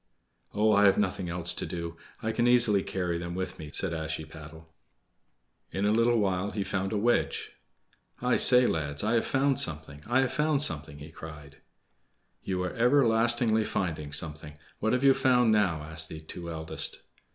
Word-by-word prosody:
"Oh, 110 +1 +3
I 100 -1 +4
have 100 - +4
nothing 95 -3 -1
else 90 +1 -1
to - - -5
do. 85 -1 -6 0.3
I 110 - -1
can 120 +2 0
easily 115 -5 +4
carry 90 -3 -3
them 85 0 -6
with 95 -1 -5
me," 75 -2 -8
said 90 +3 0
Ashiepattle. 80 0 -7 1.0
In 95 +1 -2
a 105 - +2
little 115 +2 +2
while 95 -2 0
he 105 -1 -3
found 95 0 -3
a 110 - -1
wedge. 120 +4 0 0.7
"I 125 0 +1
say, 125 0 +7
lads, 75 -5 -1
I 110 +2 0
have 115 - +1
found 135 0 +1
something! 75 -2 -3
I 120 +3 +2
have 130 -2 -1
found 150 -1 +2
something!" 80 - -1
he 75 +3 -11
cried. 75 -3 -11 0.8
"You 90 -1 -3
are 90 - -4
everlastingly 120 -3 +2
finding 80 -8 -3
something! 75 0 -2 0.2
What 110 - 0
have 125 +1 0
you 135 -1 +6
found 125 -3 +3
now?" 95 -8 +1
asked 80 +1 0
the 80 - -8
two 85 +2 -8
eldest. 80 -1 -3
95 Hz, 175 wpm, -28 LUFS, 80-115 Hz, 1.0 s, say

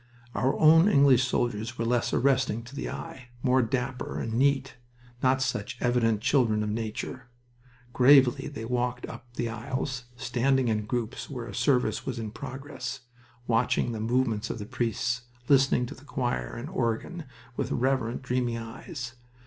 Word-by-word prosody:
Our 130 +2 +1
own 165 +5 +7
English 135 - +5
soldiers 120 0 -1
were 115 - -1
less 120 0 +1
arresting 130 -4 +2
to 125 +4 -12
the - - -3
eye, 130 -7 -7 0.2
more 130 0 +4
dapper 125 +1 -2
and 115 - -3
neat, 135 +2 +2 0.5
not 130 +1 +3
such 120 -6 -3
evident 115 -3 +2
children 115 -5 +2
of 105 - -2
nature. 115 +3 -4 0.7
Gravely 130 -1 +6
they 145 -6 -6
walked 125 +1 -1
up 120 - -10
the 120 - -1
aisles, 125 +2 -4
standing 130 0 +1
in 105 -1 -1
groups 120 +1 -3
where 125 -5 -5
a - - -8
service 125 -3 +1
was 130 -3 -4
in 110 -2 -4
progress, 135 0 -6 0.4
watching 115 +1 +1
the 110 - -4
movements 115 -1 0
of - - -3
the 105 - -6
priests, 120 +2 -1 0.3
listening 135 -3 +4
to - - -7
the 130 - -16
choir 125 -4 -2
and 130 +7 -6
organ 130 +8 -2 0.3
with - - -2
reverent, 130 -1 0
dreamy 125 -2 0
eyes. 120 - -7
125 Hz, 155 wpm, -28 LUFS, 115-135 Hz, 0.7 s, own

